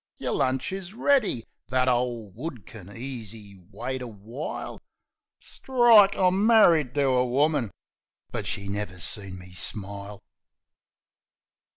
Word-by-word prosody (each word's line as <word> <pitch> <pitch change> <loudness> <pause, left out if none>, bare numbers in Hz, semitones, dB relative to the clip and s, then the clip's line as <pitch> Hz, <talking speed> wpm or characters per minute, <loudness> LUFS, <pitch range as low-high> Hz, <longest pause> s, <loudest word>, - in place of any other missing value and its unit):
"Yer - - -3
lunch 130 +3 0
is 190 +1 -6
ready. 240 - +2 0.2
That 130 0 +1
ole 120 -4 0
wood 125 - -7
kin 100 -4 -11
easy 115 -4 -8
wait 125 +6 -4
a 125 - -5
while." 115 +6 -7 0.6
Strike! 235 -6 +5
I'm 185 +1 +2
marri'd 170 - +5
to 145 - +2
a 130 -2 +3
woman... 135 -1 +1 0.6
But - - -4
she 100 - -4
never 100 -2 -4
seen 95 +2 -8
me 90 0 -13
smile. 100 +1 -8
125 Hz, 120 wpm, -26 LUFS, 105-160 Hz, 0.6 s, Strike